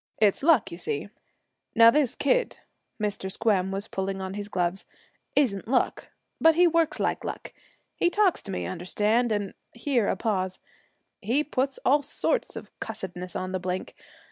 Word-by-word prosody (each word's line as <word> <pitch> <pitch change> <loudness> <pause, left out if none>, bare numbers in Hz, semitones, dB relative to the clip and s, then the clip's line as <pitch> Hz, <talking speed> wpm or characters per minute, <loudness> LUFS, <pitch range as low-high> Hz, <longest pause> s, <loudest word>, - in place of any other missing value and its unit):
It's 205 -2 +3
luck, 270 - +4
you 170 - -8
see. 145 +1 -3 0.7
Now 230 0 +8
this 290 -3 +1
kid' - - +1 0.4
Mr. 205 -2 -2
Squem 195 -3 +1
was 195 +2 -4
pulling 195 0 -3
on 190 0 -4
his 205 0 -5
gloves 180 -1 -1 0.5
'isn't 220 -10 +1
luck, 250 +1 0 0.3
but 325 0 +6
he 355 +2 +6
works 335 -1 +2
like - - 0
luck. - - -6 0.4
He 350 - +3
talks 395 -1 +2
to 200 - -7
me, - - -3
understand, 210 +6 0
and' 205 -2 -1 0.2
here 240 -3 0
a - - +1
pause 185 -4 -1 0.6
'he 245 +9 +1
puts 270 -2 -1
all 285 +3 +5
sorts 480 - -1
of - - -8
cussedness 185 -5 -6
on 185 0 -3
the 185 - -1
blink. 185 +1 -4
210 Hz, 165 wpm, -27 LUFS, 190-275 Hz, 0.7 s, Now